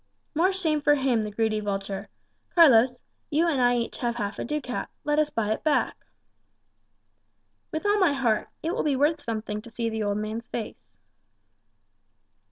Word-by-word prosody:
"More 345 +5 +3
shame 320 -6 0
for 290 0 +4
him, 260 -5 +1
the 210 - -3
greedy 215 0 0
vulture. 195 -1 -4 0.5
Carlos, 250 -7 +6 0.3
you 320 +4 +2
and 285 -6 +1
I 245 0 +4
have 240 - +1
each - - -8
half 235 -4 -2
a - - -2
ducat; 290 -4 -3
let 295 0 +1
us 305 -1 +2
buy 215 -6 -1
it 220 - -2
back." 305 -2 0 1.6
"With 315 +3 -4
all 410 0 +3
my 365 -7 +4
heart. 240 -6 0
It 325 - 0
will - - -1
be 290 -3 +1
worth 295 +3 +2
something 215 -4 -4
to 235 - -12
see 230 0 -2
the 220 0 -3
old 205 -1 0
man's 215 +2 -4
face." 230 - -7
245 Hz, 175 wpm, -26 LUFS, 220-300 Hz, 1.6 s, Carlos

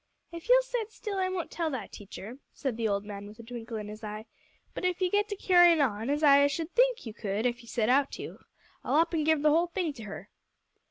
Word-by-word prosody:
"Ef 335 +6 -9
you'll - - +7
set 485 -3 -3
still, 420 -3 -5
I 370 0 +1
won't 370 -3 -4
tell 335 -2 -1
that 260 -5 -5
teacher," 210 +4 -9 0.2
said 265 -5 -2
the 230 -1 -1
old 200 -1 -1
man 205 -1 -7
with 210 +1 -12
a 230 - -11
twinkle 230 -1 -7
in 210 -1 -6
his 215 +1 -9
eye, 215 +1 -6 0.5
"but - - -6
ef 365 0 0
you 365 -1 +1
get 415 0 +2
to 410 - -3
carryin' 350 -4 +5
on, 225 -4 0
as 295 +2 0
I 280 -1 +7
should 320 +4 -4
think - - +2
you 225 - -6
could 210 +1 -3
ef 245 0 0
you 235 - -17
set 225 -2 0
out 275 +3 +3
to, - - -7 0.4
I'll - - 0
up 330 +2 +3
an' 315 -2 +1
give 310 -1 +2
the 305 - +5
whole 335 +3 +3
thing 345 -3 -2
to 230 -5 -10
her." 200 - -9
285 Hz, 255 wpm, -29 LUFS, 225-350 Hz, 0.5 s, you'll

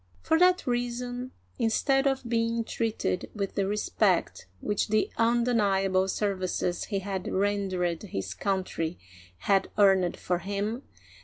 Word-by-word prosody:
For 320 0 +3
that 360 0 +4
reason, 245 0 -2 0.3
instead 270 +4 +2
of 265 -2 -1
being 230 0 0
treated 225 -5 -2
with 200 -2 -3
the 195 -1 0
respect 205 - 0
which 205 - -1
the 215 0 +1
undeniable 205 -5 +2
services 185 -3 -1
he 200 - -2
had 190 -1 -4
rendered 190 -4 0
his 95 - -4
country 180 - -2 0.4
had 195 -1 +2
earned 190 -3 +4
for 180 -1 -1
him. 205 +6 -3
205 Hz, 125 wpm, -28 LUFS, 190-235 Hz, 0.4 s, that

